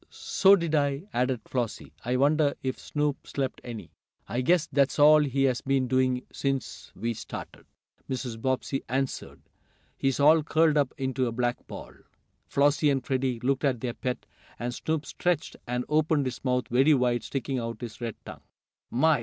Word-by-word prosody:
"So 200 0 +4
did 170 -4 -2
I," 145 0 +1
added 125 -1 0
Flossie. 120 -4 -3
"I 125 +2 0
wonder 145 +1 +3
if 130 -1 -2
Snoop 150 -1 -2
slept 135 -2 -3
any?" 110 -8 -8 0.4
"I 120 - -1
guess 170 +4 +3
that's 140 -1 +1
all 150 +1 +8
he 135 -1 0
has 130 -2 +2
been 135 -1 +1
doing 130 0 +1
since 135 -2 -3
we 115 +1 -2
started," - - -9 0.4
Mrs. 125 -4 -4
Bobbsey 130 +1 -1
answered. 135 +1 -3 0.5
"He's 135 0 0
all 155 +3 +6
curled 155 0 +3
up 145 -3 +2
into 130 -2 -1
a - - -2
black 120 +1 -2
ball." - - -9 0.5
Flossie 145 +2 +3
and 135 -3 0
Freddie 130 -3 -1
looked 135 +2 0
at 135 -4 +1
their 125 -2 -2
pet, 125 +1 -4 0.3
and 120 +1 -3
Snoop 155 +3 -2
stretched, 175 -3 -1
and 125 0 -2
opened 155 -1 +2
his 130 -1 -5
mouth 125 -1 0
very 135 +5 +5
wide, 125 -2 +1
sticking 135 -1 -3
out 115 -2 -5
his 120 0 -7
red 115 -3 -3
tongue. - - -9 0.5
"My! 150 +3 +3
135 Hz, 170 wpm, -27 LUFS, 125-145 Hz, 0.5 s, all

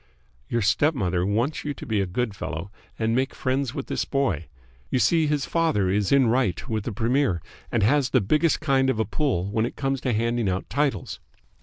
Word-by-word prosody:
"Your 115 -2 0
stepmother 100 - +1
wants 115 +9 0
you 145 -1 -3
to - - -9
be 110 -3 0
a 95 - -1
good 110 +3 -2
fellow 90 0 -5 0.3
and 110 0 0
make 130 +2 0
friends 130 0 -1
with 140 - -3
this - - -1
boy. 120 - -1 0.4
You - - +1
see, 160 +4 +3
his 150 -1 0
father 155 - +1
is 100 -1 +1
in 140 -2 +5
right 115 -7 +1
with 110 -2 -2
the 120 - -2
Premier 115 -2 +1 0.3
and 115 -4 +1
has 135 +4 +3
the 130 - +4
biggest 150 - +2
kind 135 -3 +2
of 130 - 0
a 110 - +2
pull 100 - -1
when 110 +2 +1
it - - -9
comes 135 -1 -1
to 125 - 0
handing 115 -1 0
out 95 +1 -2
titles." 145 -1 -1
120 Hz, 205 wpm, -25 LUFS, 100-140 Hz, 0.4 s, in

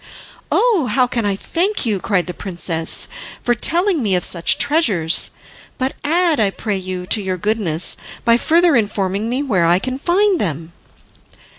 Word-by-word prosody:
"Oh, 425 - +2
how 255 -2 +3
can 235 -3 -2
I 200 - 0
thank 360 - -1
you," 210 -4 0
cried 185 -2 0
the 180 - -6
princess, 170 -4 -1 0.4
"for 240 - +2
telling 345 - +1
me 200 -5 +1
of 180 - 0
such 170 -1 +2
treasures! 200 - +2 0.5
But 260 0 -2
add, 330 0 +2
I 210 -2 +3
pray 205 +1 -4
you, 185 -1 -5
to 210 +3 +2
your 190 -1 -3
goodness 185 -5 -1 0.3
by 230 -1 +5
further 335 +4 +3
informing 205 -1 -1
me 255 +4 -1
where 190 -11 +1
I 175 +1 +4
can 255 +6 -4
find 370 +3 +2
them." 165 -2 -4
215 Hz, 165 wpm, -18 LUFS, 185-290 Hz, 0.5 s, by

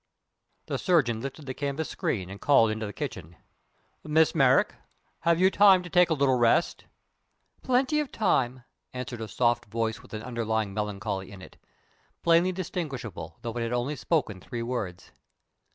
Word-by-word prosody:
The - - -3
surgeon 125 - +2
lifted 140 +3 -7
the 130 - -4
canvas 145 +2 -3
screen 95 -4 -3
and 100 - -10
called 125 -6 +5
into 110 0 -3
the - - -6
kitchen: 95 - -6 0.7
"Miss 155 +1 +3
Merrick, 135 -4 +4 0.5
have 170 0 +2
you 190 +1 +5
time 195 -3 +6
to 175 - -10
take 180 -1 +5
a 160 - +2
little 135 -3 +2
rest?" 120 +8 +2 0.8
"Plenty 265 +4 +2
of 295 -3 -3
time," 130 - 0 0.3
answered 125 -2 -5
a 110 - -4
soft 120 +3 +1
voice 115 +2 -2
with 125 -4 -10
an 110 - -6
underlying 110 -4 -2
melancholy 100 -2 -3
in 100 - -10
it, - - -13 0.7
plainly 170 +2 +4
distinguishable 145 - -5
though 115 -1 -4
it 120 - -2
had 115 +1 -2
only 125 +5 -1
spoken 130 - -1
three 115 +5 -5
words. 115 -7 -5
125 Hz, 165 wpm, -27 LUFS, 110-160 Hz, 0.8 s, time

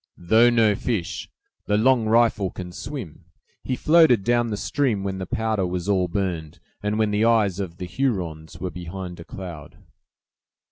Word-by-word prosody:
"Though 110 +7 +4
no 115 -3 +4
fish, 100 -4 -3 0.4
'The 105 - +2
Long 120 0 +3
Rifle' 110 -4 +3
can 90 0 -8
swim. 105 - -7 0.4
He 130 - -1
floated 155 - +5
down 120 +1 +2
the 105 -2 -3
stream 115 -5 0
when 95 -1 -3
the 95 - -5
powder 110 -4 -1
was 90 0 -3
all 95 -3 +2
burned, 85 -3 -3 0.2
and 105 +1 -1
when 110 -1 +1
the 105 +1 +1
eyes 110 -5 +3
of 90 -4 -5
the 90 - -5
Hurons 90 - -3
were 90 - -4
behind 90 0 -7
a - - -7
cloud." 85 -5 -9
100 Hz, 170 wpm, -24 LUFS, 90-115 Hz, 0.4 s, floated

